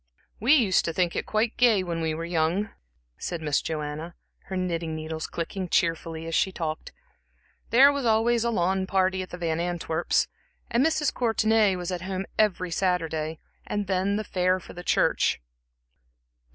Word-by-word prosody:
"We 255 +8 +5
used 215 -10 +3
to 165 - -2
think 175 0 0
it - - -2
quite 220 +1 0
gay 225 -6 +4
when 170 -2 -3
we 160 -1 -1
were 165 +1 -4
young," 170 +5 0 0.5
said 175 - -3
Miss 150 -3 0
Joanna, 155 +1 -4 0.3
her 190 - -4
knitting 170 -3 -2
needles 160 0 -4
clicking 180 +2 -4
cheerfully 165 -1 0
as 165 - -5
she 190 - +2
talked. 160 -3 -4 0.8
"There 270 +4 +7
was 280 -1 -2
always 230 +1 +3
a 235 - +1
lawn 190 -2 0
party 190 -1 +1
at 185 - -7
the 180 - -7
Van 165 -2 -1
Antwerps', 170 -2 0 0.4
and 235 +2 +3
Mrs. 310 -2 +1
Courtenay 220 -4 +2
was 180 0 -4
at 180 -2 -3
home 190 +1 -3
every 185 -4 +2
Saturday, 165 -3 -1 0.3
and 205 -1 -2
then 190 +1 0
the 215 - -1
fair 185 -2 +1
for - - -12
the 175 - -8
church." - - +2
185 Hz, 170 wpm, -26 LUFS, 165-210 Hz, 0.8 s, There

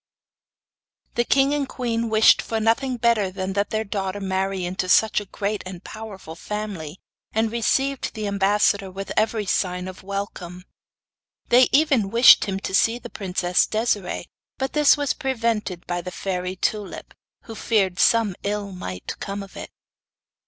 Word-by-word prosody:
The 240 - +1
king 275 +3 +3
and 285 -2 -1
queen 230 -2 -2
wished 220 0 +5
for 225 - -3
nothing 245 +4 +1
better 230 -4 +2
than 190 0 -4
that 200 +1 0
their 220 0 -1
daughter 195 -2 -3
marry 190 -1 -2
into 185 +1 -3
such 220 +4 +4
a - - -9
great 205 +2 -3
and 185 -1 -9
powerful 205 -7 -9
family, 190 -4 -6 0.3
and 220 0 +1
received 270 +4 0
the 215 -1 -4
ambassador 200 0 +2
with 195 +1 -7
every 215 0 +1
sign 180 -1 -1
of 185 0 -9
welcome. 190 -2 -6 0.9
They 250 +1 +6
even 275 -9 +3
wished 235 +3 +7
him 195 -1 -3
to 190 - -5
see 225 +4 +3
the 240 -1 -10
princess 180 -2 0
Desiree, 215 -4 -1 0.3
but 265 0 -3
this 300 -1 +5
was 290 -1 0
prevented 230 -8 -2
by 175 0 -2
the 180 - -6
fairy 180 -1 -3
Tulip, 205 +1 -3 0.3
who 225 - -9
feared 200 -5 0
some 230 -4 +4
ill 205 0 -3
might 90 - -6
come 200 0 -5
of 195 - -14
it. - - -7
205 Hz, 160 wpm, -23 LUFS, 190-230 Hz, 0.9 s, wished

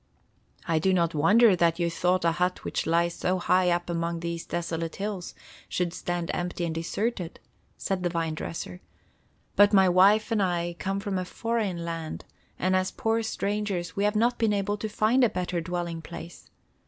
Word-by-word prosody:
"I 165 -2 +2
do 190 +4 +2
not 170 -2 +1
wonder 200 +8 +5
that 170 -1 +2
you 170 -1 +1
thought 180 +1 +1
a 165 - +4
hut 180 +2 -1
which - - -2
lies 170 +1 +2
so 185 +2 0
high 180 0 +3
up 175 0 0
among 170 -1 -2
these 170 0 -4
desolate 165 -1 -3
hills 200 -3 -4 0.3
should 175 -2 -1
stand 175 -1 -3
empty 175 0 -2
and 165 - -2
deserted," 175 +3 -3 0.4
said 190 -2 -2
the 175 - 0
vine 165 -2 -1
dresser. 165 +3 -6 0.7
"But 205 +1 +6
my 190 -1 +6
wife 200 +5 +5
and 220 -2 +2
I 175 -2 0
come 195 +1 -1
from 200 -2 -2
a - - -2
foreign 205 -5 -2
land, 165 -2 -5 0.3
and 185 +1 +1
as 185 0 +1
poor 225 0 0
strangers 205 -4 -2
we 200 - 0
have 210 +1 +1
not 235 +3 +2
been 225 -2 +2
able 205 +1 0
to 215 +1 -4
find 220 +5 +3
a 240 - +5
better 180 -3 -2
dwelling 170 -1 -3
place. 170 +1 -10
180 Hz, 185 wpm, -27 LUFS, 170-205 Hz, 0.7 s, But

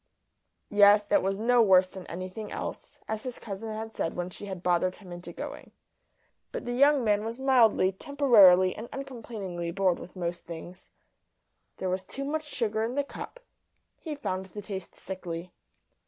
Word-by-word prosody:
Yes, 205 0 +6
it 300 - +5
was 195 0 -1
no 240 +3 +4
worse 190 -4 +6
than 185 -1 -10
anything 185 +5 -6
else, - - -6
as 220 0 -3
his 250 0 -6
cousin 215 +1 -6
had 220 +1 -6
said 165 - -2
when 180 0 -3
she 205 - -8
had 190 -2 -6
bothered 180 +1 +2
him 190 -4 -13
into 175 0 -7
going. - - -8 0.8
But - - -5
the 245 - -2
young 280 +1 +5
man 210 -1 +2
was 225 +2 -4
mildly, 245 -8 +4
temporarily, 195 -7 +5
and 230 +2 -7
uncomplainingly 220 -10 -5
bored 185 0 +1
with 180 - -11
most 175 -1 -3
things. 175 +2 -9 0.9
There 190 - -3
was 185 +1 -1
too 275 +8 -5
much 305 +2 -2
sugar 220 -6 -1
in 235 +3 -2
the 285 - +1
cup; - - -9 0.5
he 310 -3 -6
found 190 -9 -3
the 205 +2 -8
taste 190 -2 -6
sickly. 180 -2 -6
205 Hz, 170 wpm, -28 LUFS, 185-240 Hz, 0.9 s, Yes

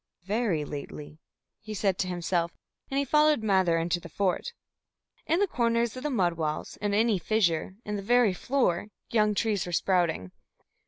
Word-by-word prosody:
"Very 200 -6 0
lately," 150 +1 -8 0.4
he 215 0 -7
said 195 -2 0
to 185 - 0
himself, 175 -1 -1 0.3
and 270 - -2
he 280 - +2
followed 300 -2 +3
Mather 190 -5 +3
into 170 +1 0
the 170 - -11
fort. 195 - -1 0.8
In 330 - +2
the 405 - +4
corners 235 - 0
of 255 - -6
the 300 - -2
mud 185 - +1
walls, 155 -2 -3
in 205 -1 -1
any 220 -2 +3
fissure, 185 -2 0
in 210 0 -3
the - - -4
very 235 -1 +3
floor, 205 -4 0 0.2
young 210 -2 +3
trees 205 -4 0
were - - -5
sprouting. 170 - +1
200 Hz, 170 wpm, -28 LUFS, 175-230 Hz, 0.8 s, the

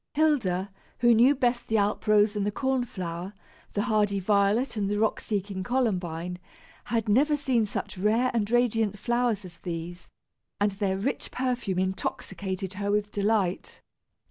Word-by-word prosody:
Hilda, 215 - +1 0.3
who 240 -1 +6
knew 245 +6 +5
best 245 -2 0
the 220 - +2
alp 205 +1 0
rose 210 0 +4
and 205 - 0
the 205 - +1
corn 265 +2 0
flower, 180 -2 -5 0.4
the 205 - 0
hardy 210 -3 +1
violet 205 +6 +2
and 200 -2 -1
the 205 - 0
rock 220 +1 +1
seeking 200 -2 -3
columbine, 180 -7 -1 0.5
had 225 0 -1
never 285 +8 +3
seen 250 -6 +1
such 195 - -5
rare 225 +6 +2
and 215 -3 0
radiant 225 -4 +2
flowers 235 -2 0
as 175 -2 -12
these, 175 +1 -6 0.5
and 205 0 +2
their 195 -1 -1
rich 230 +8 -2
perfume 250 -7 -2
intoxicated 190 0 -3
her 200 +1 -3
with 205 0 0
delight. 200 -3 0
205 Hz, 155 wpm, -27 LUFS, 190-240 Hz, 0.5 s, who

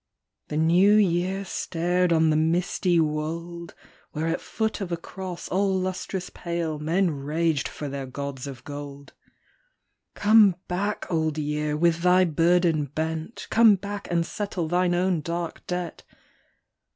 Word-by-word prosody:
" - - -59
The 150 - -3
New 175 +6 +5
Year 190 -1 +1
stared 180 0 0
on 160 -1 +4
the - - +2
misty 170 +2 +1
wold, 165 +2 -3 0.4
Where 155 +1 -2
at 165 +1 -1
foot 220 -1 -2
of 185 -3 -4
a 170 - 0
cross 185 +1 -7
all 190 0 +1
lustrous 185 0 -4
pale 170 -3 -3
Men 170 +4 +1
raged 150 +2 -1
for 150 - -6
their 135 -1 -5
gods 140 0 -5
of 130 -3 -9
gold. 145 -1 -8 0.5
" - - -50
Come 205 -3 +6
back, 200 +4 -2
Old 160 -2 0
Year, 150 0 -1
with 170 0 +3
thy 180 +1 +5
burden 165 -1 +2
bent. 160 - -4
Come 225 -2 +6
back 200 +1 -6
and 170 -1 +1
settle 195 -3 -3
thine 175 +1 +2
own 180 -2 +1
dark 170 +1 -5
debt." 180 -1 -4
170 Hz, 150 wpm, -25 LUFS, 155-185 Hz, 0.5 s, Come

